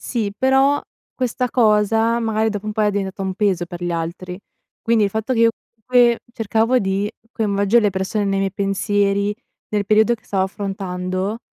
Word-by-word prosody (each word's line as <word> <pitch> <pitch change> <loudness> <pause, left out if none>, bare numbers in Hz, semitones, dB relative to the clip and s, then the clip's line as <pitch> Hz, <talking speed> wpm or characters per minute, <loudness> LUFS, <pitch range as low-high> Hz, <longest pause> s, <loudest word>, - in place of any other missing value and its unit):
Sì, 220 -5 -2
però 270 +4 +3 0.3
questa 250 0 -1
cosa 225 0 +3
magari 220 -1 0
dopo 205 0 -5
un 215 - -2
po' 215 - -2
era 210 - +3
diventata 195 -1 -3
un 190 -1 -2
peso 190 -3 +1
per 175 0 -8
gli 175 - -1
altri, 170 +2 -4 0.4
quindi 225 -2 +3
il 200 - 0
fatto 220 +5 -2
che 245 - 0
io, 230 0 +6 0.3
comunque, 240 +1 +3
cercavo 225 +3 +1
di 195 0 -1 0.2
coinvolgere 205 +1 +2
le 205 - +3
persone 190 +2 -2
nei 195 -1 0
miei 195 -1 -1
pensieri, 200 +1 0 0.3
nel 205 -1 -1
periodo 220 +3 +4
che 225 - -18
stavo 190 -2 0
affrontando 190 0 -3
205 Hz, 175 wpm, -20 LUFS, 195-225 Hz, 0.4 s, io